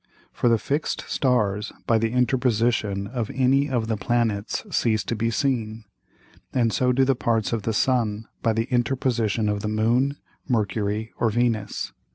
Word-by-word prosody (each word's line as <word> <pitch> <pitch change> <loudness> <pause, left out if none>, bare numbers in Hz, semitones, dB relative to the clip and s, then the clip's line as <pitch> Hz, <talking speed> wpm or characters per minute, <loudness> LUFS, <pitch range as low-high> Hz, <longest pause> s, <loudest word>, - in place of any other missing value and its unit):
For 120 - +2
the 115 - +4
fix'd 140 +8 -2
Stars 105 -6 0
by 115 -1 +3
the 115 0 0
Interposition 120 -5 +1
of 115 0 -3
any 135 +2 +3
of 120 -4 0
the 110 -1 -1
Planets 110 -1 -1
cease 110 -3 +2
to 115 - -2
be 115 +1 0
seen. 115 -4 -1 0.7
And 115 -4 +1
so 125 0 +2
do 130 +1 +3
the 135 - +3
Parts 115 -3 0
of 115 - 0
the 110 - -1 0.2
Sun 115 -4 0
by 115 - +2
the 115 +1 0
Interposition 120 -3 +1
of 105 0 0
the 105 - -3
Moon, 120 +6 +1 0.3
Mercury 110 -1 -1
or 115 - +3
Venus. 115 -2 -1
115 Hz, 165 wpm, -24 LUFS, 110-125 Hz, 0.7 s, the